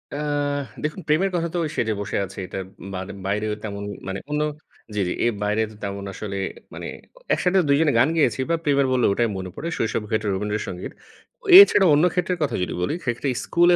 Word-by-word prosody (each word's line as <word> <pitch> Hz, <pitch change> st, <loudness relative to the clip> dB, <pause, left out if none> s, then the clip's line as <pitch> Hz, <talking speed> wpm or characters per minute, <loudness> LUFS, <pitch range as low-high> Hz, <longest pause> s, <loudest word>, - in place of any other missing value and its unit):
আহ 145 Hz, -1 st, -1 dB, 0.2 s
দেখুন 155 Hz, +5 st, -3 dB
প্রেমের 180 Hz, +6 st, +2 dB
কথা 170 Hz, -1 st, 0 dB
তো -, -, +1 dB, 0.2 s
"সেজে 110 Hz, -2 st, 0 dB
বসে -, -, -2 dB
আছে" 95 Hz, -, -13 dB
এটার 95 Hz, +1 st, -5 dB, 0.3 s
বান 95 Hz, +1 st, -4 dB, 0.2 s
বাইরেও 105 Hz, +2 st, 0 dB
তেমন 100 Hz, -1 st, -5 dB, 0.2 s
মানে 95 Hz, 0 st, -3 dB
অন্য 150 Hz, 0 st, 0 dB, 0.5 s
জি, 100 Hz, -, +1 dB
জি। -, -, -1 dB
এর 120 Hz, -, +2 dB
বাইরে 105 Hz, +2 st, +1 dB
তো -, -, -14 dB
তেমন 100 Hz, 0 st, -4 dB
আসলে 100 Hz, -1 st, -5 dB, 0.4 s
মানে -, -, -6 dB, 0.5 s
একসাথে 190 Hz, +1 st, +2 dB
দুইজনে 145 Hz, +1 st, +4 dB
গান 130 Hz, +6 st, +5 dB
গেয়েছি 145 Hz, -, +2 dB
বা 165 Hz, -, +3 dB
প্রেমের 140 Hz, -2 st, +3 dB
বললে, 125 Hz, -2 st, +3 dB
ওটাই 115 Hz, +4 st, +2 dB
মনে 95 Hz, -1 st, -5 dB
পড়ে। 170 Hz, -, -5 dB
শৈশবে 110 Hz, -1 st, -1 dB
হয়তো 110 Hz, 0 st, 0 dB
'রবীন্দ্র 105 Hz, +2 st, -1 dB
সঙ্গীত'। 90 Hz, 0 st, -6 dB, 0.7 s
এছাড়া 205 Hz, -, +8 dB
অন্য 150 Hz, +4 st, +5 dB
ক্ষেত্রের 180 Hz, 0 st, 0 dB
কথা 145 Hz, -, -1 dB
যদি -, -, -3 dB
বলি, 90 Hz, -, 0 dB
সেক্ষেত্রে 120 Hz, +3 st, -1 dB, 0.2 s
স্কুলে 175 Hz, +1 st, +4 dB
120 Hz, 190 wpm, -23 LUFS, 100-150 Hz, 0.7 s, এছাড়া